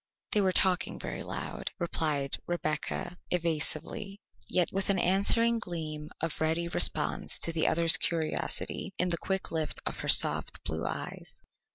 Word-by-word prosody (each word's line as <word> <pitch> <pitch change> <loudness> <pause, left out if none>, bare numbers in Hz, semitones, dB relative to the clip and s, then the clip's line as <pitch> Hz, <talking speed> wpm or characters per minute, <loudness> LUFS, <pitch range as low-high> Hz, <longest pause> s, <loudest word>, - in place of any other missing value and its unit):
"They 210 - +2
were 190 -1 +2
talking 185 -1 +2
very - - -6
loud," - - -5
replied 155 -6 -2
Rebecca 175 +1 -3
evasively, 175 +5 -2 0.3
yet 180 -2 +1
with 195 +1 -1
an 195 - +3
answering 215 +6 +3
gleam 155 -5 -6
of 165 -1 -3
ready 165 +2 0
response 170 - +4
to 165 - +3
the 165 -1 +1
other's 165 0 +4
curiosity 170 +3 -2
in 180 - +1
the 170 - +1
quick 190 -1 -2
lift 160 -2 0
of - - -3
her - - -5
soft - - +4
blue - - -3
eyes. - - -7
170 Hz, 150 wpm, -29 LUFS, 160-190 Hz, 0.3 s, response